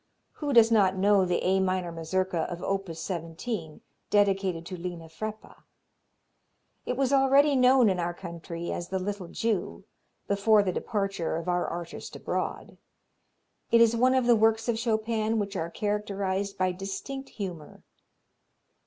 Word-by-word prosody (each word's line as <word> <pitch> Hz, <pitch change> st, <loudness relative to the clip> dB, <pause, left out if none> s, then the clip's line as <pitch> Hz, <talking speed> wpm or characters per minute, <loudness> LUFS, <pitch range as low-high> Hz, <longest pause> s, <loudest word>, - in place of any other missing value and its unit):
Who 295 Hz, -2 st, -2 dB
does 230 Hz, -3 st, +6 dB
not 195 Hz, -4 st, +4 dB
know 200 Hz, 0 st, +4 dB
the 180 Hz, -1 st, -1 dB
A 190 Hz, +1 st, +3 dB
minor 185 Hz, -2 st, 0 dB
Mazurka 165 Hz, +1 st, -1 dB
of 175 Hz, 0 st, -6 dB
op. 195 Hz, -1 st, -2 dB
17, 165 Hz, +1 st, -5 dB, 0.3 s
dedicated 195 Hz, -4 st, +2 dB
to 185 Hz, -, -6 dB
Lena 175 Hz, -2 st, -6 dB
Freppa? 215 Hz, +6 st, -7 dB, 1.3 s
Itwas 260 Hz, +1 st, 0 dB
already 275 Hz, +2 st, +5 dB
known 255 Hz, -1 st, +5 dB
in 185 Hz, -3 st, +1 dB
our 175 Hz, 0 st, -2 dB
country 170 Hz, -1 st, -6 dB
as 175 Hz, -, -4 dB
the 190 Hz, -, -1 dB
"Little 195 Hz, -1 st, -4 dB
Jew" 185 Hz, -, -2 dB, 0.4 s
before 205 Hz, +1 st, +4 dB
the 185 Hz, -, 0 dB
departure 195 Hz, -7 st, -2 dB
of 165 Hz, +2 st, -4 dB
our 180 Hz, 0 st, 0 dB
artist 170 Hz, 0 st, -6 dB
abroad. -, -, -4 dB, 0.9 s
It 230 Hz, -, +5 dB
is 230 Hz, 0 st, +5 dB
one 255 Hz, +3 st, +3 dB
of 260 Hz, -2 st, +2 dB
the 240 Hz, -1 st, +6 dB
works 225 Hz, +1 st, +2 dB
of 230 Hz, -2 st, 0 dB
Chopin 225 Hz, -1 st, 0 dB
which 200 Hz, -1 st, -2 dB
are 165 Hz, -2 st, -2 dB
characterized 200 Hz, -1 st, -2 dB
by 185 Hz, 0 st, +1 dB
distinct 200 Hz, +9 st, -6 dB
humor. 180 Hz, -7 st, -7 dB
195 Hz, 145 wpm, -28 LUFS, 175-225 Hz, 1.3 s, does